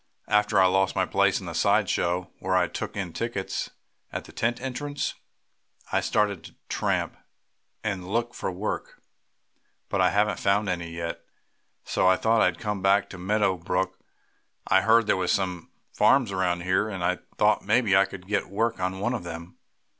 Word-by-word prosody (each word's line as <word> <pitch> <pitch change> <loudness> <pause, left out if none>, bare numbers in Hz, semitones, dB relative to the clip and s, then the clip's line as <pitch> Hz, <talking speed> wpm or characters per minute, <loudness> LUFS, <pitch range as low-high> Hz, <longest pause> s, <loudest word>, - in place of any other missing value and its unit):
"After 105 -1 +3
I 95 - +6
lost 95 +1 +2
my - - +2
place - - +2
in - - -9
the - - -5
side - - +3
show, 90 +1 -1
where 95 0 0
I 90 -1 +3
took 85 - -5
in 90 -4 -3
tickets 115 -5 -3 0.4
at - - -4
the - - -13
tent 120 +1 -1
entrance, 145 +3 -3 0.8
I - - +2
started 100 -5 0
to - - -13
tramp, - - -1 0.7
and 95 -4 -3
look 120 +3 -1
for - - -3
work. 95 +4 -4 0.9
But 100 - +1
I 90 - +5
haven't 105 +1 +1
found 100 +1 +2
any 85 -2 -2
yet. 85 0 -5 0.6
So - - +1
I 95 - +6
thought 115 +3 +2
I'd 90 -2 +2
come 105 -1 -3
back 100 +1 +3
to 95 - -9
Meadow 100 0 +1
Brook. 90 +2 -2 0.7
I 95 - +4
heard 115 +2 +4
there - - +3
were 90 -1 -1
some 90 -2 -1 0.2
farms 125 -7 +4
around 90 -2 0
here, 95 +4 +1
and 95 -4 -4
I 90 +1 +1 0.2
thought - - +3
maybe 110 -1 +3
I 95 +1 +6
could 95 -1 -10
get 100 +1 -1
work 115 +3 0
on 95 +1 -2
one 120 +5 0
of 120 - -3
them. 85 +1 -8
95 Hz, 185 wpm, -26 LUFS, 90-105 Hz, 0.9 s, I